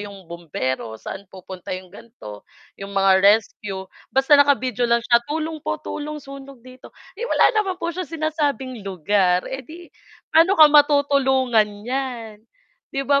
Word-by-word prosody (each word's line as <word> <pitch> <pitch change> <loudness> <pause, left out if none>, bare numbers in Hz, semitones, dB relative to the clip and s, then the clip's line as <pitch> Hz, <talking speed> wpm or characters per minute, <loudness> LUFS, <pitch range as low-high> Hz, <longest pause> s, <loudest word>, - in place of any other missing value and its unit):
'yong 200 -2 -10
bombero, 145 -9 -5
saan 190 - -9
pupunta 185 -1 -11
'yong 185 -1 -13
ganito, 200 - -12 0.3
'yong 200 0 -8
mga 195 -1 +4
rescue. 200 -1 +1 0.2
Basta 270 +2 +1
naka-video 255 -4 +1
lang 235 0 +1
siya, 235 -1 +4
"Tulong 315 +1 -3
po, - - -3
tulong 300 +1 -5
sunog 275 -3 -12
dito." 255 0 -15 0.2
Eh, 470 +5 -6
wala - - +4
naman 415 -4 -1
po 340 -1 -4
siya 360 -2 -5
sinasabing 295 -6 -2
lugar, 185 -1 0
eh 265 - -4
'di, 330 +6 -13 0.4
paano 330 +5 +5
ka 315 - +9
matutulungan 275 -6 +3 0.2
niyan, 245 -4 -4 0.5
'di 275 -1 -4
ba. 280 0 +3
255 Hz, 150 wpm, -21 LUFS, 200-290 Hz, 0.5 s, ka